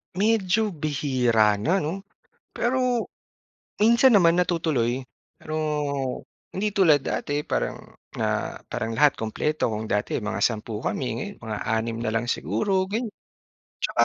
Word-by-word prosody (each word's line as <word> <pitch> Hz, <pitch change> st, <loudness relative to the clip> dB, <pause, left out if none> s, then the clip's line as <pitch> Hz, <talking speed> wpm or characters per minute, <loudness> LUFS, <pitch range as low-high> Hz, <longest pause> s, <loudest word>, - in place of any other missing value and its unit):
Medyo 210 Hz, +1 st, +2 dB
bihira 130 Hz, -, +2 dB
na, 175 Hz, -, +1 dB
'no, 190 Hz, +6 st, -4 dB, 0.5 s
pero 250 Hz, -1 st, +1 dB, 0.7 s
minsan 235 Hz, +5 st, +6 dB
naman 175 Hz, -7 st, +6 dB
natutuloy 155 Hz, -8 st, 0 dB, 0.3 s
pero 155 Hz, -, -7 dB, 1.0 s
hindi 205 Hz, +2 st, -2 dB
tulad 170 Hz, -8 st, +5 dB
dati 145 Hz, +1 st, -2 dB
parang -, -, -1 dB, 0.4 s
na -, -, -1 dB
parang 115 Hz, -, -3 dB
lahat 140 Hz, +5 st, +4 dB
kumpleto 115 Hz, +5 st, -1 dB
kung 110 Hz, 0 st, -3 dB
dati 105 Hz, 0 st, 0 dB
mga 110 Hz, -1 st, -3 dB
10 110 Hz, -1 st, -1 dB
kami 135 Hz, -, -2 dB
ngayon 205 Hz, -1 st, -5 dB
mga 110 Hz, -2 st, -5 dB
6 115 Hz, +1 st, -1 dB
na 110 Hz, -, 0 dB
lang 115 Hz, +2 st, -1 dB
siguro 190 Hz, -, 0 dB
gan 230 Hz, +4 st, -1 dB, 0.8 s
tsaka -, -, +1 dB
150 Hz, 130 wpm, -25 LUFS, -, 1.0 s, minsan